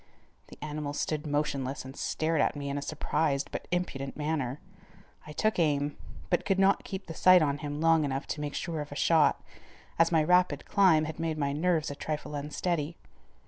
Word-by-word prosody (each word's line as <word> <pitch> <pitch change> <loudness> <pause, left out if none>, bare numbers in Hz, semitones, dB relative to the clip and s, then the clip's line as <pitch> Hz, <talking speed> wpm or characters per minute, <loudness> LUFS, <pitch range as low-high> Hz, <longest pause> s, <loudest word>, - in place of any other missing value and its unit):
The - - -13
animal 150 -1 -4
stood 150 +1 -2
motionless 140 -2 -2
and 130 +1 -9
stared 160 -1 0
at - - +1
me 140 -1 -4
in 140 - -2
a - - -6
surprised 145 -1 -1
but - - -5
impudent 140 -7 -3
manner. 150 -3 -2 0.7
I - - -7
took 215 +6 0
aim, 145 -3 +1 0.4
but 175 - +2
could 195 -1 +1
not 195 +1 +3
keep 190 0 -6
the 165 - -7
sight 185 +1 +6
on 145 -1 0
him 145 -1 -4
long 165 -1 +4
enough 135 0 -2
to 150 - -3
make 145 -1 -4
sure 165 -3 -3
of 145 - -8
a - - -6
shot, 155 -1 +3 0.6
as 165 +1 +4
my 160 -2 +4
rapid 180 +3 +3
climb 180 -6 +4
had 155 +1 -6
made 165 -1 -1
my 140 -2 0
nerves 160 0 +1
a - - -6
trifle 150 0 -4
unsteady. 150 +2 -2
150 Hz, 195 wpm, -29 LUFS, 145-165 Hz, 0.7 s, sight